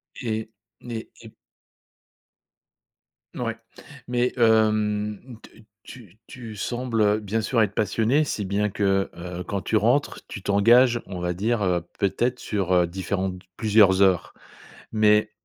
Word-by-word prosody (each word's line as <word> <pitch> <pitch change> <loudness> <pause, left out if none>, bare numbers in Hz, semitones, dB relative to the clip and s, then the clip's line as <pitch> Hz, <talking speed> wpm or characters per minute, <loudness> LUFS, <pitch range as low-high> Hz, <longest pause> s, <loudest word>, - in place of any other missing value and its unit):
Eh 110 -3 -4 0.3
né 115 -2 -7
et 110 -1 -13 2.0
Ouais. - - -3 0.5
Mais, 125 0 0
hem, 110 0 +1
te - - -15 0.3
tu 110 -5 -14
tu 115 -4 -9
sembles, 120 +2 -2
heu, 105 0 +3
bien 110 +1 -2
sûr 115 +1 +1
être 105 -1 -2
passionné, 110 +9 +1
si 105 -8 -3
bien 100 +2 0
que, 95 -1 0
heu, 90 +1 -6
quand 100 +2 -3
tu 110 - -2
rentres, 120 +7 +1
tu 100 - -8
t'engages, 120 +5 +4
on 90 -2 -6
va 90 0 -2
dire, 110 +5 -1
heu, 90 -2 +1 0.2
peut-être 120 +6 0
sur, 95 -4 -2
heu, 90 -1 +4
différentes 95 +1 -3
d 90 - -22
plusieurs 105 -3 +4
heures. 95 -3 +2 0.6
Mais, 105 -1 +3
105 Hz, 140 wpm, -24 LUFS, 95-115 Hz, 2.0 s, t'engages